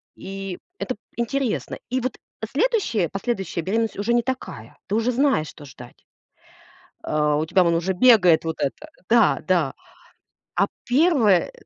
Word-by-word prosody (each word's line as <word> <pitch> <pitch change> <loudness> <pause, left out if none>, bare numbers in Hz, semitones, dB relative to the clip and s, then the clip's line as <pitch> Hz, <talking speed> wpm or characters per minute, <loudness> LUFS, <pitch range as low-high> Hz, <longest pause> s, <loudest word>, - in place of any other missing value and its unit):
И 195 -1 -7 0.2
это 255 - -3
п 210 - -37
интересно, 240 0 -2
и 255 +1 -1
вот 255 0 -3 0.3
следующая, 310 - 0
последующая 195 -1 -3
беременность 220 +5 -1
уже 205 +4 0
не 240 - +3
такая, 230 - -6
ты 205 - -1
уже 230 +3 +1
знаешь, 260 - +2
что 150 - -12
ждать. 120 -2 -14 1.0
А, 150 -1 +1
у 155 - 0
тебя 185 +3 +3
вон 170 -1 +2
уже 175 +3 0
бегает 180 -7 +5
вот 160 - -3
это. 145 - -3 0.2
Да, 230 -2 +4
да. 170 -7 +2 0.8
А - - +3 0.2
1, 250 - +3
э, - - -13
205 Hz, 155 wpm, -23 LUFS, 170-245 Hz, 1.0 s, бегает